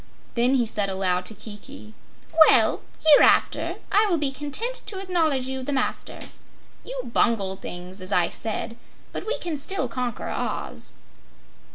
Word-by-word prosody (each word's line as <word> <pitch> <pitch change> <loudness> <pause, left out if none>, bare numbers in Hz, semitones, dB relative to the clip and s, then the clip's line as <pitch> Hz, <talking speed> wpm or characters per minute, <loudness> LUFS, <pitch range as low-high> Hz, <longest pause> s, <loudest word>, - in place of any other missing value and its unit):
Then 245 +3 +3
he 245 -3 +2
said 205 -2 0
aloud 185 -1 0
to 220 - -7
Kiki: 215 +2 -10 0.6
"Well, - - +5 0.2
hereafter 305 -2 +5 0.2
I 425 +1 +4
will 355 -4 +1
be 285 -3 0
content 295 - -2
to 395 - -4
acknowledge 325 -8 0
you 265 0 -4
the 260 - -4
master. 265 -2 -2 0.6
You - - -6
bungled 195 -5 +1
things, 180 +2 -7
as 185 +2 -5
I 175 -3 +2
said, 225 +1 -3 0.3
but - - -6
we 475 - 0
can 330 -3 -4
still 300 0 -1
conquer 245 0 -4
Oz." - - -4
255 Hz, 150 wpm, -24 LUFS, 205-310 Hz, 0.6 s, Well